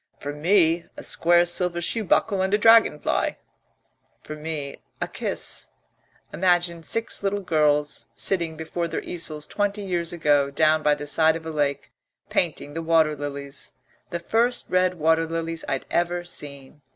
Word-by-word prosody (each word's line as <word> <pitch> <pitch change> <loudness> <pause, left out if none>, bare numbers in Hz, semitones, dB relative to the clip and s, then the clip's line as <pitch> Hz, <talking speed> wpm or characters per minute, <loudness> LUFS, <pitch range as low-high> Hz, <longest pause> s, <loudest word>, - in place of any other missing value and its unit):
"For 145 - -5
me, 165 +1 +2
a - - -8
square 175 +1 +4
silver 175 0 0
shoe 220 +6 0
buckle 195 0 +1
and 190 0 0
a - - +2
dragonfly 225 -8 +3 0.4
" - - -45
"For 155 - -7
me, 150 -2 -5 0.2
a - - -2
kiss. - - -2 0.6
Imagine 175 -2 +1
six 225 +8 0
little 200 0 -1
girls 150 -4 +1
sitting 170 -5 -1
before 170 +2 -3
their - - -4
easels 155 -3 -3
twenty 205 0 -2
years 175 -3 -1
ago, 145 -4 +2
down 155 +2 +2
by 150 -1 +3
the 145 0 -7
side 160 +2 +3
of 165 0 -7
a 160 - -4
lake, 145 -2 -2 0.4
painting 145 - -1
the 165 - -4
water 160 -2 +3
lilies, 140 -1 -7 0.4
the 170 - -3
first 230 +8 0
red 185 0 +2
water 160 0 +2
lilies 165 0 -3
I'd 135 -1 -2
ever 175 0 0
seen. 145 -4 -4
165 Hz, 160 wpm, -24 LUFS, 150-180 Hz, 0.6 s, square